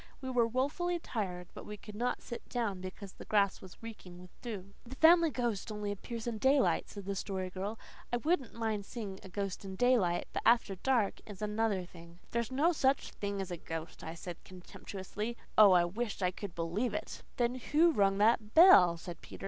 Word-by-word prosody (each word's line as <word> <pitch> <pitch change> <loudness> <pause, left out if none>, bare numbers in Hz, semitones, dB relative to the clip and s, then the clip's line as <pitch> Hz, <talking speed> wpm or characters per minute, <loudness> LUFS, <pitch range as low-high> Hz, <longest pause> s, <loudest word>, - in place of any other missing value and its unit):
We 260 -2 -5
were 240 -2 +3
woefully 290 +9 0
tired, 185 - -4
but - - -9
we 210 - -7
could 210 +1 -11
not 240 +4 -2
sit 235 - -8
down 215 -7 -2
because 185 +1 -8
the - - -11
grass 200 -2 +2
was 190 +3 -13
reeking 200 -6 -9
with 180 0 -13
dew. 200 -5 -6
"The 250 +2 -9
Family 335 +2 +6
Ghost 235 -6 -2
only 210 -1 -3
appears 225 +3 -6
in 230 -3 -3
daylight," 265 +3 +3
said 200 -2 -8
the 200 0 -2
Story 190 -2 -3
Girl. 195 +4 -4 0.3
"I 240 - +2
wouldn't 295 -1 0
mind 220 -3 -1
seeing 200 -3 -6
a 190 - -11
ghost 195 0 -4
in 190 -1 -6
daylight. 210 -7 +2
But - - -1
after 230 -3 +4
dark 225 +2 +1
is 205 -3 -9
another 210 -3 0
thing." 170 -1 -14
"There's 235 +1 -1
no 295 +7 +3
such 275 -4 +1
thing 200 -1 -4
as 190 -1 -6
a 175 - -3
ghost," 165 0 -7
I 160 +1 -6
said 170 0 -8
contemptuously. 195 +4 -7 0.2
Oh, 215 -2 +9
how - - +5
I 175 -1 +5
wished 205 +2 -3
I 180 - +2
could 190 0 -7
believe 170 +9 -1
it! - - -5 0.2
"Then 245 +1 0
what 325 +2 +5
rung 195 -1 +3
that 215 0 +2
bell?" 185 - +8
said 170 0 -9
Peter. - - -11
210 Hz, 205 wpm, -33 LUFS, 185-240 Hz, 0.3 s, Oh